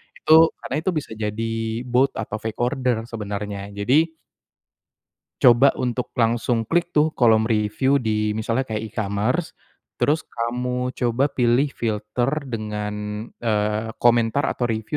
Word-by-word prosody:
Itu 160 +1 +5
karena 140 -1 -3
itu 185 - 0
bisa 150 -6 -3
jadi 115 +2 -3
bot 130 +3 +2
atau 105 -1 -4
fake 110 0 -6
order 125 -2 0
sebenernya. 100 -2 -5
Jadi 150 +11 +2 1.3
Coba 120 +3 +7
untuk 125 -1 -3
langsung 115 0 +1
klik 170 +7 -1
tuh, 155 +1 +4
kolom 110 -3 +4
review 110 +5 +1
di 105 -2 0
misalnya 115 +4 -1
kayak 110 -2 -4
e-commerce. 110 - -1 0.5
Terus 155 +2 +2
kamu 125 +2 -3
coba 125 +3 +1
pilih 125 +1 +2
filter 110 +2 -1 0.2
dengan, 105 -1 -4
eee, 110 0 -1
komentar 120 +2 +3
atau 125 - -2
review 110 +3 -2
115 Hz, 130 wpm, -22 LUFS, 110-125 Hz, 1.3 s, Coba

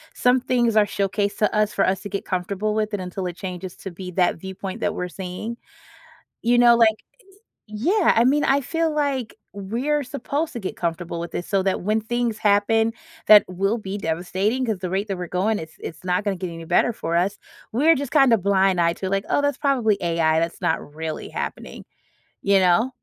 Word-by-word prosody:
some 250 0 +3
things 240 -3 +1
are 215 -1 +5
showcased 200 +1 -1
to 210 0 +1
us 210 0 +2
for - - +2
us 190 0 0
to 205 - -7
get 200 0 -4
comfortable 195 +3 -2
with 215 0 -1
it - - -4
until 185 0 -4
it 175 0 -6
changes 185 -1 -6
to 195 - -7
be 180 +1 -8
that 180 -2 +2
viewpoint 190 +1 -7
that - - -1
we're 180 - -3
seeing? 190 +6 -6 0.9
You 240 +1 +3
know, 240 -1 +7
like 220 -2 +3 0.7
Yeah, 335 - +2
I 230 - +5
mean, 285 +3 +3
I 275 +1 +3
feel 325 +3 -1
like 275 -7 -1 0.2
we're 240 +10 -1
supposed 285 +4 -3
to 235 - -3
get 190 - -4
comfortable 170 0 -3
with 170 - -5
this 175 - -4
so 195 -2 +1
that 190 0 -1
when 215 +4 +1
things 235 0 -1
happen, 220 +2 +2 0.4
that 210 -1 +9
will 195 +5 -1
be 200 -2 -5
devastating 190 +8 -1
‘cause 215 -5 -2
the 180 -2 -4
rate 195 +3 -1
that 195 - -3
we're 180 -1 -5
going, 215 +2 +1
it's 160 0 -10
it's 160 0 -8
not 180 +2 0
gonna 200 -1 0
get 180 0 -5
any 165 0 -8
better 240 - +2
for 170 -5 -4
us. 195 +4 0 0.3
We're 300 +8 +4
just 275 -3 -4
kind 270 -5 +5
of 220 -6 +3
blind 190 -2 +3
eyed 170 0 +2
to, 190 - -3
like, 195 0 -1
"Oh, - - +3
that's 285 -2 +1
probably 245 -8 +2
AI. 165 -2 +2
That's 165 0 -3
not 145 - -2
really 160 -1 -5
happening," - - -6 0.6
you 200 0 +3
know? 185 +7 +3
200 Hz, 210 wpm, -23 LUFS, 180-235 Hz, 0.9 s, that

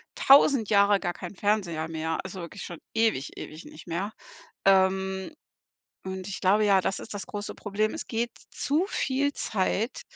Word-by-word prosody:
1.000 270 -5 +6
Jahre 200 -1 +5
gar 175 -2 -2
kein 180 +2 -8
Fernseher 180 -6 0
mehr, 160 0 -2
also 190 -1 -7
wirklich 180 +3 -8
schon 175 - -8
ewig, 220 -11 0
ewig 155 +2 -8
nicht 155 - -13
mehr. 185 +5 -2 0.6
Ähm, 190 +3 +3 0.7
und 190 0 -5
ich 190 - -5
glaube 205 +3 +4
ja, 195 -2 +5
das 190 +2 -1
ist 220 - -8
das 200 - -5
große 205 -1 -6
Problem. 215 +1 -1
Es - - -6
geht 235 +1 -1 0.2
zu 310 +7 0
viel 285 -5 0
Zeit 215 +4 -1
195 Hz, 165 wpm, -27 LUFS, 185-215 Hz, 0.7 s, 1.000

